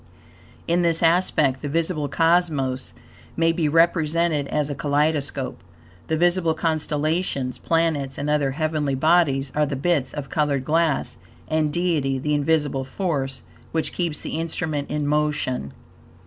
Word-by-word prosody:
In 170 +1 +2
this 170 -1 +2
aspect 165 -6 +3
the 145 - -4
visible 160 -1 0
cosmos 155 -6 +1 0.4
may 165 0 +3
be 165 -2 0
represented 165 -2 +2
as 150 0 0
a 145 - -3
kaleidoscope. 145 -2 -1 0.5
The 160 - 0
visible 175 -1 +2
constellations, 155 -3 -1
planets, 160 -5 0
and 145 - -3
other 150 -2 +2
heavenly 150 -1 -1
bodies, 140 -3 +2
are 150 0 +1
the 140 - -3
bits 140 -2 0
of 145 -2 -5
colored 145 -3 0
glass; 160 -1 +1 0.3
and 155 -1 +1
Deity 155 -6 0
the 150 +3 -1
invisible 145 -2 +1
force, 135 - -3 0.3
which 160 -1 -1
keeps 170 -4 -2
the 155 - -4
instrument 160 -3 -3
in 150 -1 -1
motion. 150 - -1
150 Hz, 135 wpm, -23 LUFS, 140-165 Hz, 0.5 s, aspect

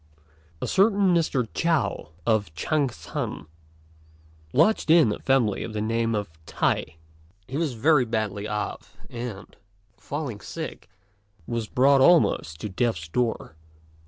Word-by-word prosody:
A - - +1
certain 195 -2 +3
Mr. 150 -8 +1
Chao, 165 - 0 0.2
of 110 -6 +1
Ch'ang 140 - 0
shan, 80 -5 -5 1.1
lodged 165 - +3
in 160 -8 +6
a - - -4
family 130 -7 +1
of 110 - -6
the 105 - -2
name 115 +1 0
of 105 -1 -2 0.2
T'ai. 80 - -1 0.5
He 130 - -7
was 155 -3 0
very 140 +2 +4
badly 105 -2 -2
off, 105 0 -5
and, 115 -4 -7 0.4
falling 140 -7 -5
sick, - - -7 0.6
was 115 +1 -3
brought 135 +3 +4
almost 130 - +3
to - - -3
death's 95 -6 -1
door. 115 -5 -2
120 Hz, 130 wpm, -25 LUFS, 105-150 Hz, 1.1 s, in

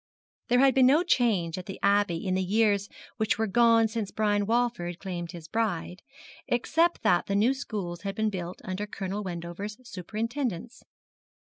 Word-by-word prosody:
There 245 - +3
had 270 -1 +5
been 260 0 +5
no 300 +6 +5
change 200 - +1
at 180 - -9
the 195 - -6
Abbey 200 -3 +2
in 185 - 0
the 190 - +1
years 205 +1 +2 0.3
which 220 -3 +1
were 220 - +1
gone 230 +2 +4
since 220 -2 -3
Brian 205 -1 0
Walford 225 -7 0
claimed 175 -3 -5
his 170 -3 -10
bride, 190 -4 -2 0.5
except 325 +8 +1
that 175 - +3
the 200 - 0
new 225 +6 +3
schools 200 -10 -5
had 195 -1 -4
been 220 0 0
built 180 -2 -6
under 190 +3 -3
Colonel 200 0 -4
Wendover's 180 +3 -6
superintendence. 230 - -4
205 Hz, 165 wpm, -28 LUFS, 185-230 Hz, 0.5 s, had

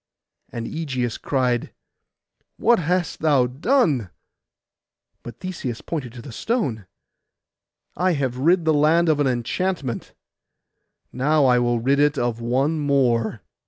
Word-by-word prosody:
And 115 -1 -5
Ægeus 130 -7 -3
cried, 125 -3 0 0.9
'What 235 0 +3
hast 175 0 -1
thou 145 -5 +3
done?' 140 - +1 1.1
But 120 -1 -10
Theseus 145 -11 -5
pointed 135 -8 -5
to 120 -2 -10
the 135 - -9
stone, 120 - -2 1.1
'I 180 +2 +1
have 130 -4 -2
rid 170 +4 +3
the 160 - +3
land 160 +3 +3
of 150 -2 +2
an 145 - +2
enchantment: 130 - -2 1.0
now 145 +3 +2
I 125 -1 +4
will 120 -1 +1
rid 135 +4 +1
it 145 0 +3
of 120 -2 -1
one 135 +7 0
more. 120 -7 +1
140 Hz, 125 wpm, -22 LUFS, 120-160 Hz, 1.1 s, I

